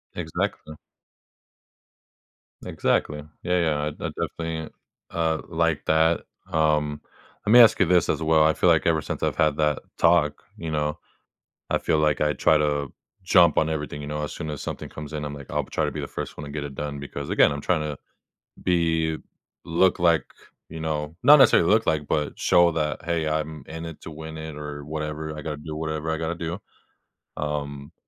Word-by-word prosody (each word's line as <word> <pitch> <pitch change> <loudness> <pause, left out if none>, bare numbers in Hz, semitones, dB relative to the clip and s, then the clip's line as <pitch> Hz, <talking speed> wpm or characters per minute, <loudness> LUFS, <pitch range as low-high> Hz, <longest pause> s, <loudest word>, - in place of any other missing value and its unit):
Exactly. 80 -2 -3 1.9
Exactly. 75 0 0 0.2
Yeah, 90 0 +1
yeah, 80 -3 +1
I 75 - -1
I 75 - -4
definitely, 80 -1 -4 0.4
uh, 80 -1 0
like 80 -3 0
that. 80 +1 +3 0.3
Um, 75 -2 +1 0.4
let 105 - +3
me 120 - +10
ask 110 -1 +6
you 95 - +5
this 90 0 +3
as - - 0
well; 80 -1 +4
I 80 - +4
feel 90 - +2
like 80 -3 +3
ever 80 -2 +2
since - - -5
I've - - 0
had 75 -2 +3
that 75 -2 +1 0.2
talk, 85 -3 +3
you 80 - -5
know, 75 0 -1 0.7
I - - +2
feel 80 - +1
like 75 -1 +2
I 75 0 +2
try 80 - +3
to 75 -2 0 0.3
jump 90 -3 +5
on 80 - +1
everything, 75 -2 -4
you 75 - -6
know? 75 0 -3
As 75 - -4
soon 75 - -6
as 75 - -5
something - - -6
comes 75 0 -8
in, 75 -1 -3
I'm 75 0 -5
like, 70 -2 -10
I'll - - 0
try - - -1
to - - -2
be - - -5
the - - -5
1st - - -6
one 75 - -7
to 70 - -8
get 75 0 -4
it 70 -1 -6
done 70 0 -4
because, 70 0 -6
again, - - +4
I'm 70 0 -4
trying 85 -1 +1
to 75 -2 -4 0.7
be 80 -2 +1 0.5
look 85 +3 +2
like 85 -2 +3 0.5
you 80 0 -7
know? 75 -1 -3
Not 150 - +9
necessarily 85 -10 +6
look 110 +2 +4
like, 75 -2 0
but 75 -1 -1
show 85 0 +4
that, 75 0 -2
"Hey, 85 -2 0
I'm 75 -1 -2
in 80 +1 -7
it 80 -2 -8
to - - -8
win 80 0 -8
it 80 -1 -7
or 75 -1 -7
whatever. 75 0 -4
I 75 - -6
gotta 75 -2 -4
do 75 +1 -7
whatever 80 0 -3
I 80 - 0
gotta 80 +1 -2
do." 85 +1 -4 0.8
Um, 70 -1 -4
80 Hz, 200 wpm, -25 LUFS, 75-80 Hz, 1.9 s, me